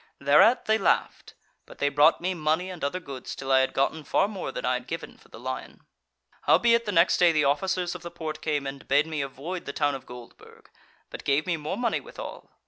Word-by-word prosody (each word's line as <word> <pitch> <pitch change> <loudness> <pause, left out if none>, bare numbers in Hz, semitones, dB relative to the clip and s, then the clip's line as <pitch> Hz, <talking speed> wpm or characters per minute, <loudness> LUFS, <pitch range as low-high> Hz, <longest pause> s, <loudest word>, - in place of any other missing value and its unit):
Thereat 150 - +5
they 220 0 +2
laughed: 195 - 0 0.3
but - - -14
they 145 - +1
brought 150 +4 +4
me 185 +2 -1
money 165 +3 -1
and 180 - -9
other 140 +6 -1
goods, 140 -7 -8
till 135 0 -4
I 130 - +6
had 130 - +1
gotten 150 +3 0
far 195 - +2
more 205 -3 -5
than - - -5
I - - +2
had - - -4
given - - -6
for - - -22
the - - -12
lion. - - -6 0.7
"Howbeit 235 0 +4
the 210 - -2
next 170 -1 +4
day 175 -1 +5
the 150 -2 +2
officers 180 +5 0
of - - -8
the 170 - -7
Porte 160 -3 -6
came 145 -3 -1
and 135 0 -7
bade 145 +3 +3
me 155 -2 -3
avoid 140 +7 -6
the 140 - -5
town 145 -1 +1
of 135 - -8
Goldburg, 125 -1 -14 0.4
but - - -8
gave 140 +2 +1
me 180 -2 0
more 155 +4 -4
money 240 -1 0
withal. - - -9
155 Hz, 225 wpm, -26 LUFS, 140-185 Hz, 0.7 s, I